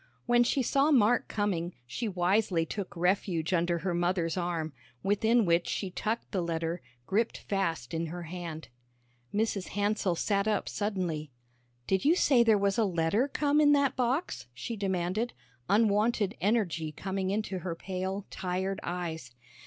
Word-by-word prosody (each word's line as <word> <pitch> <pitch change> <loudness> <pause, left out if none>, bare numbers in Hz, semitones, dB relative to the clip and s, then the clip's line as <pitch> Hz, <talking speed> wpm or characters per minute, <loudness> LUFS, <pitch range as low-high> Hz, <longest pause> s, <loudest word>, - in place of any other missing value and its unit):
When 240 0 +5
she 260 +2 +1
saw 275 +4 +3
Mark 245 -5 +4
coming, 180 -5 -1
she 170 - -3
wisely 185 -2 +1
took 195 +3 -5
refuge 180 -1 +1
under 170 0 +2
her 180 +1 -2
mother's 175 -1 0
arm, 170 -4 -2 0.3
within 220 +3 +3
which 170 0 +2
she 190 -3 -2
tucked 220 +5 -3
the 190 - 0
letter, 165 0 -2 0.2
gripped 220 - 0
fast 170 -10 -2
in 165 0 -1
her 175 +2 -6
hand. 165 -2 -6 0.6
Mrs. 210 -3 0
Hansell 205 -3 0
sat 200 +3 0
up 215 - 0
suddenly. 180 -8 -2 0.6
"Did 190 +5 +1
you 315 +4 +5
say 270 -8 +4
there 225 -2 +5
was 200 +3 +1
a - - +4
letter 190 +6 +1
come 290 +1 +2
in 290 -1 +6
that 280 -2 +3
box?" 255 - -1
she 230 - -4
demanded, 195 +3 -1 0.4
unwonted 210 0 +2
energy 180 -7 +1
coming 190 +3 -3
into 200 -2 -1
her 170 -1 -4
pale, 190 +2 -4
tired 190 +1 -2
eyes. 165 -6 -4
190 Hz, 155 wpm, -30 LUFS, 175-220 Hz, 0.6 s, in